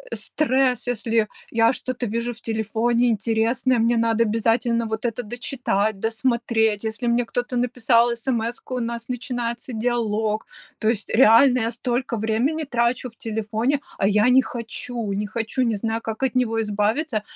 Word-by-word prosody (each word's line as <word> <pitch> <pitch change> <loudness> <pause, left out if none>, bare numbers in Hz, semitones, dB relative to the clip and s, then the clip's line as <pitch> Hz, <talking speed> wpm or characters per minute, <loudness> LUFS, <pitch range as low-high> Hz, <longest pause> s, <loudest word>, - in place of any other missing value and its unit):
стресс, 260 -4 0
если 230 -2 -3
я 220 -2 +3 0.2
я 230 +1 +4
что-то 255 -1 -4
вижу 235 +3 -2
в 225 - -13
телефоне 225 +2 0
интересное, 230 +3 +1
мне 230 +1 +2
надо 230 0 +2
обязательно 230 +1 +1
вот 220 +1 -4
это 240 +1 -2
дочитать, 220 -3 -1
досмотреть. 225 -2 0
Если 225 +2 -3
мне 235 +1 +2
кто-то 245 +1 -3
написал 240 -1 +3
эсэмэску, 235 +1 -3
у - - -1
нас 235 0 -4
начинается 245 0 -4
диалог. 220 -2 -1 0.3
То 215 - -1
есть 220 -2 -2
реально 250 +2 +6
я 225 +1 0
столько 245 +1 -2
времени 230 +9 0
трачу 245 -2 0
в 230 - -21
телефоне, 225 +5 -1 0.2
а 195 - +2
я 210 +3 +4
не 260 +1 +6
хочу 235 -3 -5
не 205 +1 -2
хочу, 225 +4 -2
не 230 -3 +1
знаю, 225 +2 -2
как 225 +3 -4
от 265 - 0
него 230 -3 +1
избавиться, 215 +5 0
230 Hz, 160 wpm, -23 LUFS, 220-245 Hz, 0.3 s, реально